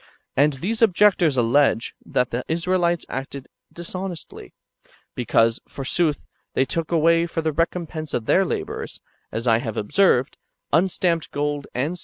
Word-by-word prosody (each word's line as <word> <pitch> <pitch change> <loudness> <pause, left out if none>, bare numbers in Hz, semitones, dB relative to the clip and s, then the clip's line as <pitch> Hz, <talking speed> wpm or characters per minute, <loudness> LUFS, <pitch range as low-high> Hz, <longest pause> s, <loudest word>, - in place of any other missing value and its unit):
And 145 +2 +4
[these 200 - -3
objectors] 185 - +4
allege 120 -1 +2
that 125 -1 0
[the 120 +2 -2
Israelites] 175 +1 0
acted 135 0 -6 0.2
dishonestly, 180 0 -7 0.6
because, 115 -1 +2
forsooth, 150 +3 -1 0.3
they 130 - +3
took 165 +4 -3
away 165 +1 +3
for 165 -1 -3
the 160 - +1
recompense 165 -1 -2
of 115 - -2
their 190 - +4
labours, 185 - -4 0.3
as 115 +2 -4
I 115 -2 +4
have 110 -2 -5
observed, 130 - +2 0.3
unstamped 170 0 +1
gold 145 0 -2
and - - -24
silver - - -6
in 130 - +2
a - - -2
1 - - -4
Ex. 180 - -8
155 Hz, 160 wpm, -23 LUFS, 130-175 Hz, 0.6 s, And